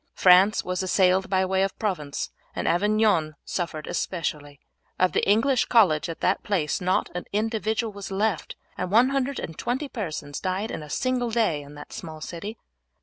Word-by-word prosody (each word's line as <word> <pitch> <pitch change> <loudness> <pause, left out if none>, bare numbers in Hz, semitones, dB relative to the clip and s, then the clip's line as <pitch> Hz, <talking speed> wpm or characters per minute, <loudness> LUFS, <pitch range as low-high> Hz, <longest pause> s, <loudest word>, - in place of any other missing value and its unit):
France 185 +3 +6
was 180 0 -2
assailed 185 0 +3
by 190 0 +2
way 190 0 +1
of 195 0 -1
Provence, 165 -10 -3 0.2
and - - -2
Avignon 200 -4 +2
suffered 165 -4 -3
especially. 150 -5 -3 0.4
Of 185 0 +3
the - - +1
English 240 +5 +3
college 170 -8 +4
at 165 - -6
that 185 - +2
place 185 -5 -1
not 185 +1 +1
an 180 - -4
individual 220 +1 -1
was 200 -1 -7
left, 200 -2 -1 0.2
and 180 - -2
120 255 - +1
persons 155 - -5
died 190 +3 -2
in - - -4
a 150 - -10
single 255 - 0
day 215 -10 +1
in 145 +1 -12
that 145 - -11
small 160 -2 -7
city. 200 +8 -6
190 Hz, 160 wpm, -25 LUFS, 165-220 Hz, 0.4 s, France